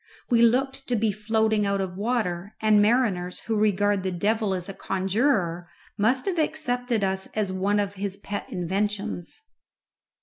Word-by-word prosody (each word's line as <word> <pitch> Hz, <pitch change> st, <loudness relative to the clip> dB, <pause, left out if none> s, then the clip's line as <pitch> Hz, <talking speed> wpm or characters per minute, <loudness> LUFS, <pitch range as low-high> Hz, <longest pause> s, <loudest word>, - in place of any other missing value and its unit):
We 235 Hz, -1 st, +5 dB
looked 265 Hz, +3 st, +2 dB
to 245 Hz, -, +1 dB
be 220 Hz, -1 st, +1 dB
floating 215 Hz, 0 st, +1 dB
out 200 Hz, 0 st, 0 dB
of 185 Hz, -2 st, -3 dB
water, 200 Hz, -4 st, -1 dB
and 215 Hz, -1 st, +4 dB
mariners 205 Hz, -6 st, +1 dB
who 225 Hz, -, -2 dB
regard 205 Hz, -1 st, +2 dB
the 190 Hz, 0 st, -2 dB
devil 205 Hz, +2 st, 0 dB
as 180 Hz, -1 st, -3 dB
a 195 Hz, -, -6 dB
conjuror 190 Hz, -3 st, 0 dB, 0.3 s
must 245 Hz, +6 st, +2 dB
have 370 Hz, -4 st, -1 dB
accepted 245 Hz, -8 st, 0 dB
us 190 Hz, 0 st, -1 dB
as 210 Hz, -3 st, 0 dB
one 200 Hz, +2 st, +1 dB
of 200 Hz, -1 st, -1 dB
his 200 Hz, 0 st, -2 dB
pet 205 Hz, 0 st, -5 dB
inventions. 200 Hz, -, -3 dB
205 Hz, 160 wpm, -25 LUFS, 190-230 Hz, 0.3 s, We